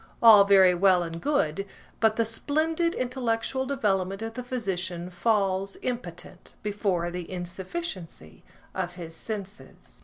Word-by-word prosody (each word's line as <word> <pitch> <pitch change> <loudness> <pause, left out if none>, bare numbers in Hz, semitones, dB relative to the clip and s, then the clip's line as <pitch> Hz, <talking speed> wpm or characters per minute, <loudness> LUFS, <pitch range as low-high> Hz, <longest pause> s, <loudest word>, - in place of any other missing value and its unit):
All 215 -4 +9
very 190 -2 +6
well 180 0 +4
and 165 0 -6
good, 195 - 0 0.4
but 220 -1 +3
the 230 - +1
splendid 315 +9 0
intellectual 250 +1 -1
development 195 -6 0
of 225 0 -5
the 250 +1 -5
physician 185 -8 -3
falls, 195 0 0
impotent, 185 -7 -6
before 195 -5 -1
the 175 0 -6
insufficiency 180 - -6 0.3
of 180 -1 -3
his 165 -2 -8
senses. 205 +1 -8
195 Hz, 125 wpm, -27 LUFS, 180-230 Hz, 0.4 s, All